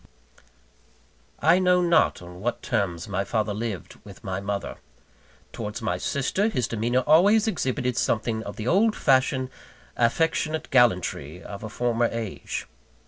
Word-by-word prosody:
I 165 +4 +5
know 180 -1 +3
not 170 - +3
on 90 0 -11
what 120 +5 -3
terms 95 -7 -1
my 100 -1 -1
father 105 +1 -1
lived 105 -3 -5
with - - -13
my 95 0 -3
mother. 100 0 -4 0.8
Towards 105 0 -5
my 105 -6 -2
sister, 140 - 0
his 125 - -1
demeanour 120 +3 0
always 200 +8 +5
exhibited 130 - -1
something 110 0 0
of - - -7
the 110 - -6
old 210 - +3
fashioned, 130 -1 +2 0.4
affectionate 155 +5 0
gallantry 90 - +2
of 100 +1 -8
a 110 - -5
former 120 +1 +1
age. 115 -4 -4
120 Hz, 140 wpm, -25 LUFS, 105-150 Hz, 0.8 s, I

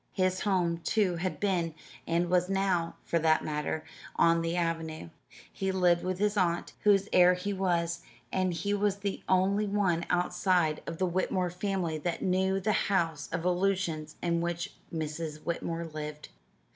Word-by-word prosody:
His 185 -1 +1
home, 175 -4 +1
too, 185 0 +1
had 180 +2 -3
been 175 -5 0 0.3
and 170 +1 +1
was 180 0 +3
now, 195 -4 0
for 170 - 0
that 160 0 +3
matter 150 +1 -2 0.3
on 165 0 +4
the 165 +1 -1
avenue. 165 - -2 0.4
He 190 0 -1
lived 180 -2 +3
with 185 0 -1
his 205 +1 +1
aunt, 175 -3 0
whose 200 -1 +4
heir 180 0 +7
he 200 +3 -3
was, 170 -3 0 0.3
and 185 -1 +1
he 175 +4 -1
was 205 -1 +1
the 200 -1 -4
only 195 +3 +3
one 190 -4 +1
outside 180 -2 +1
of 165 - -4
the 185 - +1
Whitmore 185 0 0
family 180 -4 -2
that 170 +3 -3
knew 190 +1 +2
the 210 +3 +1 0.2
house 165 -6 0
of 165 +1 -2
illusions 180 -4 0
in 170 -1 +1
which 175 +3 -3 0.2
Mrs. 155 -1 -4
Whitmore 170 0 -3
lived. 150 -1 -7
175 Hz, 160 wpm, -30 LUFS, 165-190 Hz, 0.4 s, heir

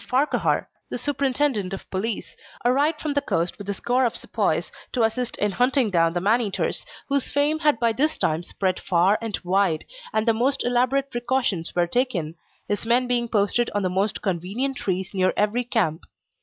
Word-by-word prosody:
Farquhar, 260 +8 +1 0.2
the - - -3
Superintendent 270 -8 0
of 195 - -7
Police, 200 +3 -3 0.3
arrived 290 +5 +2
from 300 -2 -2
the 285 - +1
coast 170 -4 -1
with 205 0 -7
a - - +1
score 250 +5 +1
of 240 - +1
sepoys - - -1 0.2
to 245 - +2
assist 235 +2 -1
in 205 0 +1
hunting 250 0 +2
down 165 -2 +3
the 175 - 0
man 215 +7 +3
eaters, 205 -4 -2 0.2
whose 280 -2 0
fame 295 +2 +2
had 300 -6 +2
by 230 -1 +3
this 300 +7 +1
time 155 +1 0
spread 185 +1 -2
far 185 +3 +2
and 225 -3 -2
wide, 180 -3 +1 0.3
and 220 +1 0
the 230 - +5
most 265 +5 0
elaborate 255 +3 +1
precautions 240 -7 -1
were 175 -1 +3
taken, 175 - -1 0.3
his 205 -1 -1
men 240 +2 +3
being 240 -1 +1
posted 225 +2 +1
on 205 - +1
the 185 - 0
most 195 +3 -1
convenient 200 +9 -1
trees 190 -4 -2
near 185 -1 +2
every 210 +4 +1
camp. 195 -10 0
225 Hz, 185 wpm, -24 LUFS, 190-255 Hz, 0.3 s, the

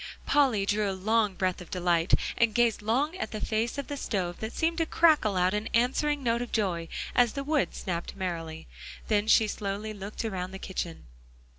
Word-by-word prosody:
Polly 255 -9 +3
drew 205 0 +1
a - - -1
long 215 0 +1
breath 185 0 -1
of 180 - -11
delight, 175 -1 +2 0.2
and 230 -3 +2
gazed 235 -3 +3
long 265 - 0
at - - -3
the 215 - -5
face 225 +5 -1
of 280 - -3
the 290 - -5
stove 185 -10 -2
that 220 +1 -4
seemed 330 +5 0
to 325 - +1
crackle 305 - +4
out 180 +1 +2
an 210 +1 -2
answering 275 +4 +1
note 235 -1 +1
of 245 - -5
joy 180 -6 0 0.3
as 245 -2 +4
the 275 - -3
wood 295 0 0
snapped 170 -3 -4
merrily; 165 -4 -4 0.4
then 210 -1 +2
she 220 - +6
slowly 210 +1 -4
looked 205 +2 -6
around 185 -4 -3
the - - -5
kitchen. 180 -3 -5
215 Hz, 195 wpm, -28 LUFS, 185-240 Hz, 0.4 s, she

